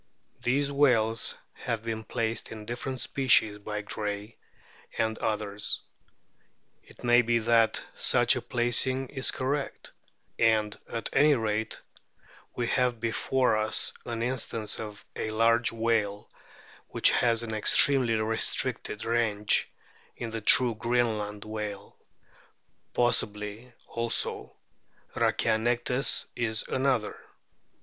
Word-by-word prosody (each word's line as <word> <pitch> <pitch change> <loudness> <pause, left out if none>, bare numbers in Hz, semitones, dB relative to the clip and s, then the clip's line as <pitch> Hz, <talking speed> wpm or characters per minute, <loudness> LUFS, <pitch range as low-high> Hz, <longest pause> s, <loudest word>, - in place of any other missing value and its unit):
These 140 +3 +1
whales 115 -6 +2 0.2
have 115 -1 -4
been 110 -1 -4
placed 110 +1 -3
in 110 -1 -8
different 125 +3 -5
species 115 -7 +2
by 105 0 -5
Gray 105 +1 -5 0.6
and 110 0 0
others. 105 -1 -1 1.0
It - - -18
may 120 0 +5
be 120 0 +1
that 115 0 +2
such - - +3
a - - -3
placing 125 +2 0
is 135 -2 -2
correct; 140 +2 -3 0.5
and, 110 -2 +2 0.2
at 115 -1 -3
any 150 0 +5
rate, 110 -2 -2 0.8
we 120 - -1
have 125 -1 0
before 120 +1 +1
us 110 0 0
an 115 -1 -4
instance 115 -3 -2
of 105 -2 -8
a - - -3
large 115 +2 +2
whale 110 -3 -1 0.6
which - - +3
has 115 -1 +2
an 110 -1 -5
extremely 120 +2 +5
restricted 110 +1 -1
range 110 -3 +1 0.5
in 115 -2 -6
the 115 0 -4
true 120 +3 +6
Greenland 110 -3 -1
whale; 105 -2 -6 1.0
possibly 105 0 -1 0.2
also 115 0 -3 0.6
Rhackianectes 120 +4 +1
is 110 -2 0
another. 130 -5 0
115 Hz, 110 wpm, -28 LUFS, 110-120 Hz, 1.0 s, true